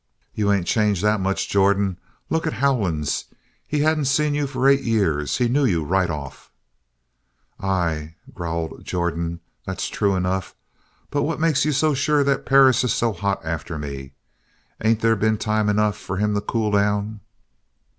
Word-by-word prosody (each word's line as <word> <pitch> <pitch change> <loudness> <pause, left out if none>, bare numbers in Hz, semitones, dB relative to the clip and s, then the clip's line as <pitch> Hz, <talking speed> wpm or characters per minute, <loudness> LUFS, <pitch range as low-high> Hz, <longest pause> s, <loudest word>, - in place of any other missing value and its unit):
"You 105 -1 +1
ain't 100 -4 +1
changed 105 -1 +1
that 105 0 +2
much, 95 +1 -1
Jordan. 100 -1 +2 0.3
Look 160 0 0
at - - -1
Howlands. 105 - 0 0.4
He 150 -1 0
hadn't 155 -1 +2
seen 150 +2 +2
you 145 -1 0
for 130 -1 0
eight 140 0 +5
years. 80 - 0
He 125 - +2
knew 140 +5 +2
you 85 - +2
right 90 +3 +1
off." 75 -4 -7 1.1
"Ay," 80 -5 -1 0.2
growled 85 -1 -4
Jordan. 85 -1 -2 0.2
"That's 95 -1 -4
true 100 -2 +1
enough. 95 0 -2 0.6
But 145 - 0
what 160 +1 -1
makes 160 -4 +2
you 150 - +2
so 150 +2 +2
sure 145 +2 +2
that 140 0 0
Perris 135 -2 +5
is 125 - +1
so 115 -2 +1
hot 100 +1 -2
after 80 0 -4
me. 70 -2 -7 0.7
Ain't 110 0 +2
there 115 0 +3
been 110 +1 +1
time 105 0 0
enough 105 0 +1
for 95 - -5
him 105 +1 +1
to 105 - 0
cool 110 -1 -1
down?" 105 +1 0
105 Hz, 165 wpm, -22 LUFS, 90-130 Hz, 1.1 s, eight